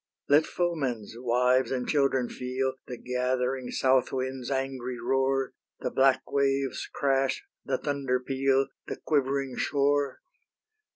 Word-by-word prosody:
Let 150 Hz, +2 st, +5 dB
foemen's 140 Hz, -, -2 dB
wives 125 Hz, +2 st, +2 dB
and 125 Hz, -2 st, -2 dB
children 135 Hz, -4 st, +2 dB
feel 130 Hz, +2 st, -2 dB
The 125 Hz, -, -6 dB
gathering 125 Hz, +1 st, -1 dB
south 130 Hz, -1 st, +2 dB
wind's 130 Hz, -1 st, -3 dB
angry 130 Hz, -2 st, -2 dB
roar, 135 Hz, +2 st, +1 dB, 0.3 s
The -, -, -2 dB
black 130 Hz, -1 st, +4 dB
wave's 140 Hz, -1 st, 0 dB
crash, 135 Hz, -1 st, +1 dB, 0.2 s
the -, -, 0 dB
thunder 140 Hz, -3 st, -1 dB
peal, 135 Hz, +1 st, +1 dB, 0.2 s
The -, -, -3 dB
quivering 135 Hz, -3 st, 0 dB
shore. 140 Hz, -1 st, +1 dB
135 Hz, 120 wpm, -28 LUFS, 125-135 Hz, 0.3 s, Let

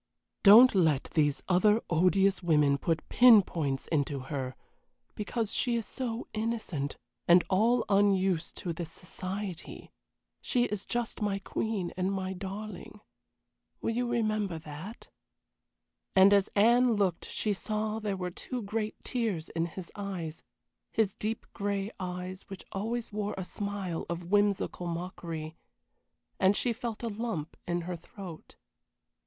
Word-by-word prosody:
Don't 225 Hz, +6 st, +9 dB
let 160 Hz, -8 st, +2 dB
these 145 Hz, -3 st, +2 dB
other 210 Hz, +4 st, +4 dB
odious 190 Hz, +3 st, +3 dB
women 150 Hz, -5 st, +3 dB
put 165 Hz, +1 st, -1 dB
pin 240 Hz, -5 st, +8 dB
points 140 Hz, -7 st, -2 dB
into 145 Hz, -3 st, 0 dB
her, 130 Hz, -1 st, -4 dB, 0.6 s
because 220 Hz, +1 st, -2 dB
she 240 Hz, -1 st, +2 dB
is 230 Hz, -2 st, -1 dB
so 240 Hz, -2 st, -4 dB
innocent, 215 Hz, -11 st, -2 dB, 0.3 s
and 175 Hz, +1 st, +7 dB
all 230 Hz, +5 st, +3 dB
unused 195 Hz, -4 st, +2 dB
to 175 Hz, -4 st, -3 dB
this 165 Hz, -1 st, -6 dB
society. 185 Hz, +1 st, -6 dB, 0.5 s
She 245 Hz, -2 st, +1 dB
is 210 Hz, -4 st, -3 dB
just 240 Hz, -2 st, -2 dB
my 205 Hz, -2 st, +1 dB
queen 200 Hz, -2 st, -3 dB
and 185 Hz, +1 st, 0 dB
my 190 Hz, -1 st, -2 dB
darling. 200 Hz, +1 st, -7 dB, 0.8 s
Will -, -, -1 dB
you 245 Hz, +2 st, 0 dB
remember 215 Hz, -6 st, 0 dB
that?" 160 Hz, +8 st, -9 dB, 1.1 s
And 195 Hz, +1 st, +7 dB
as 200 Hz, -1 st, +4 dB
Anne 235 Hz, +3 st, +5 dB
looked 190 Hz, -5 st, 0 dB
she 210 Hz, -, -1 dB
saw 215 Hz, +2 st, -2 dB
there 205 Hz, -3 st, -2 dB
were 180 Hz, -1 st, -3 dB
two 245 Hz, +6 st, -5 dB
great 215 Hz, +1 st, -2 dB
tears 215 Hz, -10 st, -2 dB
in 165 Hz, 0 st, -1 dB
his 170 Hz, +1 st, -9 dB
eyes 185 Hz, -6 st, -5 dB, 0.5 s
his 215 Hz, -4 st, +1 dB
deep 220 Hz, +2 st, -3 dB
gray 200 Hz, 0 st, -2 dB
eyes 180 Hz, 0 st, -5 dB
which 195 Hz, -2 st, -9 dB
always 225 Hz, +3 st, -3 dB
wore 210 Hz, 0 st, -2 dB
a 190 Hz, -, -4 dB
smile 195 Hz, -2 st, -4 dB
of 170 Hz, +1 st, -5 dB
whimsical 205 Hz, -3 st, +1 dB
mockery 165 Hz, -2 st, -5 dB, 0.8 s
and 195 Hz, +1 st, +4 dB
she 245 Hz, -, +1 dB
felt 230 Hz, -1 st, -5 dB
a -, -, -1 dB
lump 210 Hz, -8 st, -4 dB
in 175 Hz, 0 st, 0 dB
her 175 Hz, +1 st, -4 dB
throat. 175 Hz, 0 st, -10 dB
195 Hz, 140 wpm, -30 LUFS, 175-215 Hz, 1.1 s, Don't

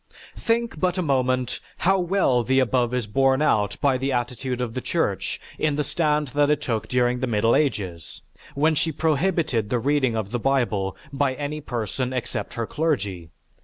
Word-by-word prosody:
Think 230 Hz, -6 st, -1 dB
but 180 Hz, +1 st, +1 dB
a 185 Hz, -, +1 dB
moment 130 Hz, -3 st, 0 dB, 0.2 s
how 190 Hz, +2 st, +2 dB
well 175 Hz, -9 st, +2 dB
the 130 Hz, +3 st, +1 dB
above 125 Hz, -1 st, +2 dB
is 125 Hz, -2 st, -1 dB
borne 135 Hz, +5 st, +2 dB
out 105 Hz, -9 st, +1 dB
by 135 Hz, -3 st, +2 dB
the 135 Hz, +1 st, -1 dB
attitude 125 Hz, 0 st, -2 dB
of 120 Hz, -2 st, -2 dB
the 130 Hz, -, -3 dB
Church 100 Hz, -, -1 dB, 0.2 s
in 155 Hz, -2 st, +1 dB
the 150 Hz, -, 0 dB
stand 150 Hz, -1 st, 0 dB
that 145 Hz, +3 st, +2 dB
it 150 Hz, -1 st, +3 dB
took 110 Hz, -4 st, -2 dB
during 125 Hz, 0 st, +1 dB
the 130 Hz, -, -1 dB
Middle 115 Hz, 0 st, +2 dB
Ages, 95 Hz, -, -2 dB, 0.3 s
when 155 Hz, +3 st, +3 dB
she 160 Hz, +2 st, 0 dB
prohibited 155 Hz, -, 0 dB
the 125 Hz, -, +1 dB
reading 130 Hz, -1 st, +1 dB
of 105 Hz, -2 st, -3 dB
the 120 Hz, -, -1 dB
Bible 115 Hz, -7 st, 0 dB, 0.2 s
by 135 Hz, -1 st, +1 dB
any 150 Hz, +2 st, -4 dB
person 125 Hz, 0 st, -3 dB
except 125 Hz, -2 st, -4 dB
her 115 Hz, -, -2 dB
clergy. 105 Hz, -, -2 dB
130 Hz, 180 wpm, -24 LUFS, 115-150 Hz, 0.3 s, it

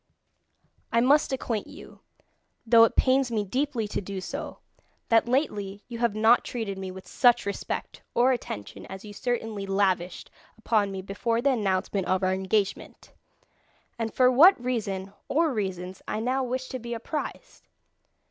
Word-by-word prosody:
"I 230 Hz, -, +3 dB
must 280 Hz, +5 st, +4 dB
acquaint 235 Hz, -5 st, -2 dB
you, -, -, -13 dB, 0.7 s
though 230 Hz, 0 st, +7 dB
it -, -, -2 dB
pains 260 Hz, 0 st, +3 dB
me 220 Hz, -3 st, 0 dB
deeply 250 Hz, +1 st, -1 dB
to -, -, -2 dB
do 195 Hz, 0 st, -5 dB
so, -, -, -6 dB, 0.5 s
that 230 Hz, 0 st, +4 dB
lately 210 Hz, -7 st, -1 dB
you 235 Hz, -2 st, -7 dB
have 235 Hz, -3 st, +1 dB
not 225 Hz, +3 st, +5 dB
treated 220 Hz, -5 st, -4 dB
me 190 Hz, -1 st, -5 dB
with 190 Hz, 0 st, -10 dB
such 245 Hz, -2 st, +3 dB
respect 200 Hz, -, -4 dB
or 250 Hz, +2 st, +4 dB
attention 105 Hz, -, -5 dB
as 190 Hz, +2 st, -9 dB
you 205 Hz, -, -9 dB
certainly 225 Hz, -3 st, -3 dB
lavished 190 Hz, -3 st, 0 dB, 0.3 s
upon 215 Hz, -3 st, +1 dB
me 190 Hz, -1 st, -5 dB
before 230 Hz, +4 st, -1 dB
the 275 Hz, +3 st, +3 dB
announcement 195 Hz, -4 st, 0 dB
of 185 Hz, +1 st, +1 dB
our 185 Hz, 0 st, +2 dB
engagement, 190 Hz, +1 st, -2 dB, 0.9 s
and 225 Hz, -1 st, -2 dB
for 255 Hz, -1 st, +4 dB
what 320 Hz, +9 st, +7 dB
reason 205 Hz, -6 st, -3 dB
or 315 Hz, 0 st, +2 dB
reasons 190 Hz, -3 st, -4 dB
I -, -, -2 dB
now 255 Hz, +4 st, 0 dB
wish 255 Hz, +1 st, -3 dB
to 255 Hz, -, -4 dB
be 235 Hz, 0 st, -5 dB
apprised. 305 Hz, -, -6 dB
225 Hz, 155 wpm, -27 LUFS, 195-250 Hz, 0.9 s, though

